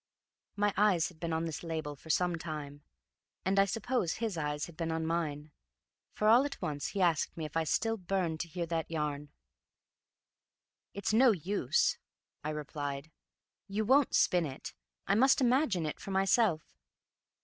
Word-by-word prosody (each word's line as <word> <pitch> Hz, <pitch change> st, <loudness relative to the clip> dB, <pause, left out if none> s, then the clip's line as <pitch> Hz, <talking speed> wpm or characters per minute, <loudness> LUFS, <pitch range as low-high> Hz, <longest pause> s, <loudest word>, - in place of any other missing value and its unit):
My 205 Hz, -1 st, +1 dB
eyes 195 Hz, -5 st, +3 dB
had 170 Hz, -3 st, -18 dB
been 170 Hz, 0 st, -3 dB
on 160 Hz, +1 st, 0 dB
this 160 Hz, -2 st, -4 dB
label 160 Hz, -3 st, -4 dB
for 160 Hz, -, -16 dB
some 175 Hz, +2 st, +2 dB
time, 150 Hz, -3 st, -6 dB, 0.6 s
and 195 Hz, +1 st, +2 dB
I 195 Hz, -, +6 dB
suppose 225 Hz, -2 st, -1 dB
his 225 Hz, -4 st, -3 dB
eyes 150 Hz, -2 st, -2 dB
had 170 Hz, -, -13 dB
been 165 Hz, 0 st, -2 dB
on 160 Hz, 0 st, -1 dB
mine, 155 Hz, -3 st, -2 dB, 0.6 s
for 215 Hz, -, 0 dB
all 235 Hz, +4 st, +7 dB
at 285 Hz, 0 st, -4 dB
once 145 Hz, -2 st, -3 dB
he 195 Hz, -2 st, -1 dB
asked 170 Hz, -2 st, +1 dB
me 160 Hz, -, -3 dB
if 150 Hz, -, -9 dB
I 165 Hz, 0 st, +1 dB
still 225 Hz, +7 st, 0 dB
burned 180 Hz, -4 st, -1 dB
to 170 Hz, -, -3 dB
hear 170 Hz, +1 st, -3 dB
that 165 Hz, -1 st, -2 dB
yarn. 150 Hz, -2 st, -3 dB, 1.7 s
"It's 200 Hz, +1 st, -1 dB
no 250 Hz, +3 st, +6 dB
use," 185 Hz, -6 st, 0 dB, 0.4 s
I 150 Hz, -, -2 dB
replied. 145 Hz, -1 st, -5 dB, 0.6 s
"You 210 Hz, +2 st, -1 dB
won't 270 Hz, +4 st, +4 dB
spin 175 Hz, -3 st, +3 dB
it. 135 Hz, -, -8 dB, 0.3 s
I 195 Hz, -, +2 dB
must 265 Hz, +6 st, +5 dB
imagine 250 Hz, -, +2 dB
it 150 Hz, -, -4 dB
for -, -, -8 dB
myself." 195 Hz, -3 st, +2 dB
170 Hz, 170 wpm, -32 LUFS, 155-200 Hz, 1.7 s, all